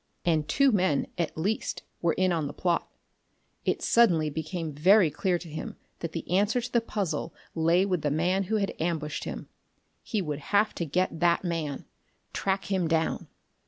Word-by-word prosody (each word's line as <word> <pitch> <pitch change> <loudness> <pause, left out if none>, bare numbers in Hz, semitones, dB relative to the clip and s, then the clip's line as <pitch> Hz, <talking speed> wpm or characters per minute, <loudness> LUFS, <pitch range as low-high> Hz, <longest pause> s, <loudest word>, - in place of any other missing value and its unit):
And 160 -3 +2
two, 275 - +4
men, 185 - +2
at 165 -2 -1
least, 200 +7 -2 0.2
were 170 -2 +2
in 185 -1 +2
on 160 -4 0
the 145 - -8
plot.... 175 -2 0 0.8
It - - 0
suddenly 170 -10 +4
became 160 +1 -4
very 180 +3 +5
clear 180 +4 0
to 170 - -10
him 155 0 -6 0.2
that 170 - -4
the 165 - -5
answer 200 +7 +2
to 245 +1 -5
the 235 - +3
puzzle 200 -7 -3 0.2
lay 170 +3 +3
with 180 -4 0
the 145 - 0
man 180 +6 +1
who 220 +4 -1
had 200 -2 0
ambushed 160 -3 -2
him. - - -6 0.5
He 215 - -2
would 150 -6 -3
have 205 +7 +2
to 170 - -3
get 175 +2 0
that 170 +1 +3
man. 165 -5 -3 0.5
Track 195 0 -1
him 185 -3 +1
down. 160 0 0
175 Hz, 180 wpm, -28 LUFS, 160-195 Hz, 0.8 s, very